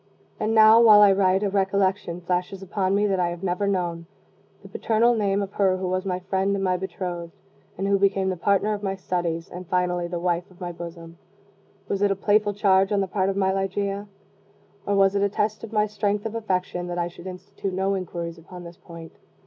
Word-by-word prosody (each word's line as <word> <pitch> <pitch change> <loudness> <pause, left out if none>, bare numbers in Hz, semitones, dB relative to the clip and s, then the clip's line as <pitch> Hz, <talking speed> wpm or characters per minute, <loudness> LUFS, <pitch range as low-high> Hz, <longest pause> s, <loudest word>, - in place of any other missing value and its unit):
And 220 +1 0
now, 220 +1 +7
while 210 -3 +8
I 200 - +7
write, 190 0 +2
a 205 - +1
recollection 190 -2 0
flashes 180 +2 -2
upon 195 0 -1
me 205 +1 +2
that 195 -2 0
I 175 -1 +1
have 175 +1 -7
never 190 +2 -1
known 175 -4 -2 0.6
the - - -11
paternal 230 +2 +2
name 200 -3 0
of 195 - -6
her 190 -2 +2
who 185 0 -3
was 185 +1 -2
my 180 -1 -1
friend 190 +2 0
and 195 - -2
my 185 -1 +1
bethrothed, 175 -2 -5 0.5
and 195 +2 -2
who 200 0 +2
became 195 -1 +2
the 185 - -1
partner 200 +4 +1
of 205 - -5
my 195 -2 -2
studies, 175 -3 -3
and 180 0 -9
finally 180 -1 0
the 175 0 -4
wife 175 +2 -1
of 185 -1 -20
my 175 -2 -5
bosom. 170 0 -10 0.7
Was 200 -1 -2
it 205 - +3
a 195 - +1
playful 205 +1 +1
charge 195 -1 +3
on 205 - +2
the 195 - -1
part 190 0 0
of 195 - -2
my 190 -1 +2
Ligeia? 200 +1 -2 0.8
or 200 - +1
was 195 0 +4
it 200 - 0
a 200 - +2
test 210 +2 -2
of 225 - -8
my 210 -1 +2
strength 205 0 -2
of 225 - -3
affection, 185 -5 -2
that 175 0 -4
I 175 -1 0
should 175 +1 -11
institute 190 +1 -6
no 190 +1 0
inquiries 170 -3 -5
upon 180 +2 -11
this 170 0 -11
point? 165 -2 -12
190 Hz, 220 wpm, -24 LUFS, 180-200 Hz, 0.8 s, while